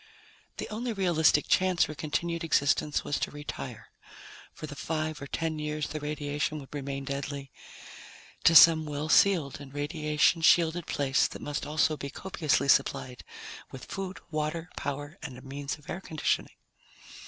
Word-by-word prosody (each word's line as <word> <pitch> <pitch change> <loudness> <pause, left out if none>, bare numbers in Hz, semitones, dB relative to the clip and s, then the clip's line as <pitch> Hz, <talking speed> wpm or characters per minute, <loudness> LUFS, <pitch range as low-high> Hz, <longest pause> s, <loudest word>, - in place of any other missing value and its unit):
The - - -4
only 230 +2 -3
realistic 170 -6 +3
chance 185 -2 +3
for 155 - -3
continued 165 +3 -2
existence 150 -1 +2
was 145 - -1
to - - -1
retire, 145 0 -7 0.6
for - - -8
the 145 -1 -8
five 155 0 -3
or 140 - -6
ten 160 +1 -2
years 150 0 -3
the 155 - -4
radiation 150 0 -2
would 140 -1 -10
remain 140 -1 -4
deadly, 140 0 -5 0.9
to 165 - +6
some 160 -1 +8
well 150 +1 -3
sealed 160 -7 +3
and 135 -2 -10
radiation 150 +2 +1
shielded 170 0 +4
place 140 -1 +2
that - - -9
must 145 0 -3
also 155 0 +1
be 140 - -5
copiously 155 -4 0
supplied 125 -2 +1 0.5
with 130 - -9
food, 195 -1 -5
water, 155 +3 -3
power, 145 +4 -5
and 135 -6 -7
a 130 - -12
means 140 +2 -5
of 150 - -20
air 185 - -5
conditioning. 155 -4 -1
150 Hz, 155 wpm, -29 LUFS, 145-165 Hz, 0.9 s, some